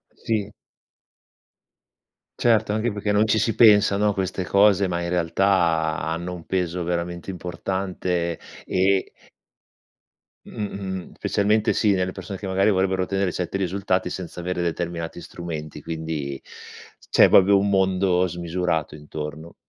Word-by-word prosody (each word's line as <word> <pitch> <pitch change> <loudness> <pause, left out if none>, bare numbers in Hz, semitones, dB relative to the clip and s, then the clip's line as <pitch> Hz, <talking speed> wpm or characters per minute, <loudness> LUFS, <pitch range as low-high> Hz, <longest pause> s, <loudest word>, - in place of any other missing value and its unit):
Sì. 105 -2 -2 1.9
Certo, 110 -3 +3
anche 110 +2 0
perché 105 0 -2
non 105 +2 +3
ci 110 - +2
si 110 +1 +1
pensa, 105 -3 +6
no, 105 +1 +2
a - - 0
queste 95 0 -2
cose, 100 0 +4
ma 85 -1 -2
in 85 - -3
realtà 85 -2 +1
hanno 85 +3 -3
un 85 -2 -9
peso 90 -1 -1
veramente 85 +1 -3
importante, 90 -1 -3 0.3
e 95 +1 +1 1.3
Mh. - - -12
Mh-mh 100 -2 -5 0.3
specialmente 105 +2 +1
sì, 105 - +2
nelle 95 -1 0
persone 95 0 -7
che, 100 - -5
magari, 95 +2 +2
vorrebbero 95 -1 +1
tenere 95 -1 -1
7 90 +1 -3
risultati 95 -1 -1
senza 90 -1 -7
avere 90 0 -2
determinati 85 0 -3
strumenti. 75 -4 -7
Quindi, 80 -4 -4 0.7
c'è - - +6
proprio 100 +1 +6
un 100 +1 0
mondo 95 -1 +2
smisurato 85 -2 -2
intorno. 75 +2 -8
90 Hz, 135 wpm, -23 LUFS, 85-100 Hz, 1.9 s, pensa